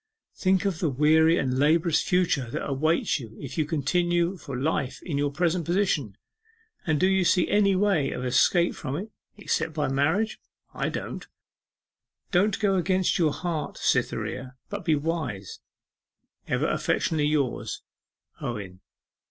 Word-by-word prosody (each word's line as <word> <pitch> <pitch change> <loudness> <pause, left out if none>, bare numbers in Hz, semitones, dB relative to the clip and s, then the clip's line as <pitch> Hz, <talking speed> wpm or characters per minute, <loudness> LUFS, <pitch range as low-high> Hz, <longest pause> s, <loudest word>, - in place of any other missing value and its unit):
Think 190 0 +1
of 190 -5 -1
the 165 - +1
weary 160 +4 +4
and 130 -1 0
laborious 160 +3 +3
future 175 -9 +1
that - - -4
awaits 150 +3 +1
you 115 -3 -10
if 140 - -7
you 155 - +1
continue 175 +4 +1
for 140 -6 -7
life 140 -1 -1
in 145 -6 -2
your 145 0 +1
present 175 +2 0
position, 165 - 0 0.7
and 155 -3 +2
do - - +3
you 190 -1 +3
see 180 0 +3
any 200 -2 +3
way 185 -8 +2
of 125 - -4
escape 150 +8 +3
from 135 -1 -5
it 210 +5 -6 0.3
except 165 -6 -2
by 150 -3 0
marriage? 160 +11 +1 0.3
I - - -1
don't. - - -6 1.0
Don't 200 +3 +2
go 200 -2 +2
against 185 +1 +1
your 160 -3 +3
heart, 165 -1 -4
Cytherea, 130 0 -1 0.2
but - - -5
be 160 -2 +3
wise. 145 - -3 0.9
Ever - - 0
affectionately 150 -2 0
yours, 145 -5 -1 0.6
OWEN. 100 -6 -5
160 Hz, 145 wpm, -26 LUFS, 140-180 Hz, 1.0 s, weary